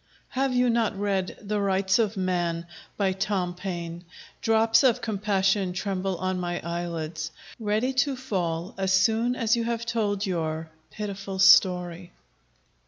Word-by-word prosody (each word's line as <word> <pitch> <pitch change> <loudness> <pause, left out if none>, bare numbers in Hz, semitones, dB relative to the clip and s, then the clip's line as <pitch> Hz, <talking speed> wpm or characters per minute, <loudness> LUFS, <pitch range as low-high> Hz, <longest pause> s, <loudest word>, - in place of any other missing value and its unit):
Have 270 +1 0
you 250 -1 +3
not 230 -4 +1
read 195 -2 -1
the 210 0 -2
'Rights 190 +1 +2
of 215 -2 +1
Man,' 175 -3 -1 0.3
by 195 -2 +2
Tom 185 -2 -1
Paine? 175 -2 -5 0.4
Drops 225 0 +4
of 255 -5 +4
compassion 195 -3 0
tremble 190 0 -2
on 185 0 -2
my 175 0 -2
eyelids, 165 -2 -4 0.3
Ready 220 +4 0
to 265 +2 +1
fall, 180 -10 -3
as 190 -1 +1
soon 225 +6 +3
as 230 -2 +2
you 235 - -1
have 235 0 -2
told 210 -3 0
your 160 -3 -2 0.2
Pitiful 200 -2 -5
story. 180 -2 +4
195 Hz, 140 wpm, -26 LUFS, 180-220 Hz, 0.4 s, Drops